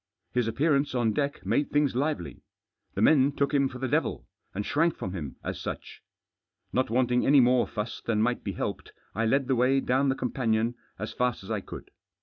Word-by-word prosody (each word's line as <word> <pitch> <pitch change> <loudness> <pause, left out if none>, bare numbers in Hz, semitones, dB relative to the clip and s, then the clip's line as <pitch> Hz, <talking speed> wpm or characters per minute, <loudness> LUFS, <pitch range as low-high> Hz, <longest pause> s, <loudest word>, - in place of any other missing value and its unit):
His 125 -2 +1
appearance 140 +3 +1
on 115 -3 +2
deck 145 +2 -2
made 145 - +1
things 145 -3 +1
lively. 140 - -2 0.5
The - - +1
men 140 -2 +5
took 140 +1 0
him 140 -1 +3
for 130 - -8
the 130 +1 -2
devil, - - -1 0.3
and 105 +2 -4
shrank 165 +2 +1
from 95 - -5
him 75 -8 -5
as - - -4
such. - - -6 0.7
Not 130 - +1
wanting 125 +1 +2
any 140 +1 +6
more 125 0 +4
fuss 105 +1 -5
than 110 -2 0
might 120 +3 +1
be - - -3
helped, - - -4 0.2
I 115 +3 0
led 135 +4 +2
the 130 - +2
way 130 +3 +3
down 135 +1 +1
the 130 - +1
companion 115 -3 0 0.2
as 105 - -5
fast 125 -4 -1
as - - -8
I - - -1
could. - - -10
125 Hz, 200 wpm, -28 LUFS, 115-140 Hz, 0.7 s, any